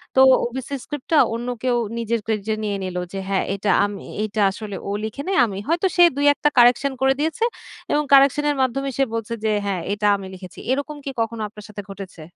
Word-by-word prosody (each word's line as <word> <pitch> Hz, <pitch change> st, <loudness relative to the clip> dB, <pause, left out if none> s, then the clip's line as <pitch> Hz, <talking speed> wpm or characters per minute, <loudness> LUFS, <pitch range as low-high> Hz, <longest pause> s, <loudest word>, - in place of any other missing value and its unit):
তো 265 Hz, -, +6 dB, 0.2 s
ওবিসি 260 Hz, +3 st, -4 dB
স্ক্রিপ্টটা 295 Hz, +2 st, -1 dB, 0.2 s
অন্য 240 Hz, +1 st, -5 dB, 0.2 s
কেউ 250 Hz, -2 st, +2 dB, 0.2 s
নিজের 230 Hz, -1 st, -1 dB
ক্রেডিটে 220 Hz, -1 st, -1 dB
নিয়ে 205 Hz, -1 st, -1 dB
নিলো 180 Hz, -1 st, -3 dB
যে, 195 Hz, -, -3 dB
"হ্যাঁ 195 Hz, -, +1 dB
এটা 200 Hz, 0 st, 0 dB
আমি 205 Hz, -1 st, -5 dB
এ -, -, -10 dB
এইটা 215 Hz, 0 st, -2 dB
আসলে 205 Hz, 0 st, -7 dB
ও -, -, -1 dB
লিখে 220 Hz, +6 st, -5 dB
নাই, 385 Hz, -, +1 dB
আমি" 195 Hz, -3 st, -5 dB
হয়তো 340 Hz, +4 st, +2 dB
সে 350 Hz, -, +7 dB
২-১ 290 Hz, 0 st, +4 dB
টা -, -, +7 dB
কারেকশন 245 Hz, +3 st, +5 dB
করে 265 Hz, 0 st, +4 dB
দিয়েছে 320 Hz, +9 st, -1 dB, 0.5 s
এবং 300 Hz, 0 st, +2 dB
কারেকশনের 285 Hz, +2 st, +5 dB
মাধ্যমে 275 Hz, +2 st, 0 dB
সে 275 Hz, -, +3 dB
বলছে 230 Hz, +1 st, -3 dB
যে, 215 Hz, -, +2 dB
"হ্যাঁ! 190 Hz, -4 st, -1 dB
এটা 210 Hz, 0 st, 0 dB
আমি 195 Hz, -, -8 dB
লিখেছি।" 185 Hz, -1 st, -11 dB
এরকম 285 Hz, +2 st, -2 dB
কি 275 Hz, -, -3 dB
কখনো 225 Hz, 0 st, -3 dB
আপনার 210 Hz, 0 st, -12 dB
সাথে 205 Hz, -1 st, -7 dB
ঘটেছে? 190 Hz, -4 st, -9 dB
235 Hz, 210 wpm, -22 LUFS, 205-280 Hz, 0.5 s, সে